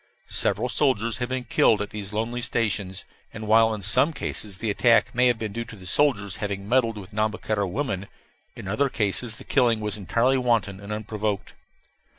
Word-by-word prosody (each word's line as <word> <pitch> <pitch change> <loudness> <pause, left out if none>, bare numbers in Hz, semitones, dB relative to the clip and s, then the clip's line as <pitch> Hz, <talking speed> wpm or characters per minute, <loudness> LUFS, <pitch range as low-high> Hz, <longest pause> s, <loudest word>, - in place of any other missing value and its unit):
Several 115 +5 +1
soldiers 120 -3 +1
have 120 0 -2
been 130 0 -2
killed 115 -2 +3
at 105 - -4
these 105 -2 -6
little 110 +1 0
lonely 120 +1 -5
stations; 100 -5 -1 0.3
and 110 - -7
while 110 +1 +5
in 105 -2 -4
some 130 - +4
cases 105 -8 -5
the 110 +1 -1
attack 115 +3 +3
may 125 +1 +4
have 120 -2 +2
been 110 -2 -4
due 115 +2 -3
to 115 - -10
the 95 -3 -13
soldiers 105 -4 +1
having 100 -1 -4
meddled 115 -2 +2
with 100 +1 -10
Nhambiquara 110 -1 -1
women, 100 -4 -3 0.5
in - - -8
other 135 +8 +1
cases 110 +1 -1
the - - -10
killing 120 -5 +2
was 105 -1 -3
entirely 120 +7 +1
wanton 115 -6 0
and 100 +1 -8
unprovoked. 105 -1 -3
110 Hz, 190 wpm, -25 LUFS, 100-120 Hz, 0.5 s, while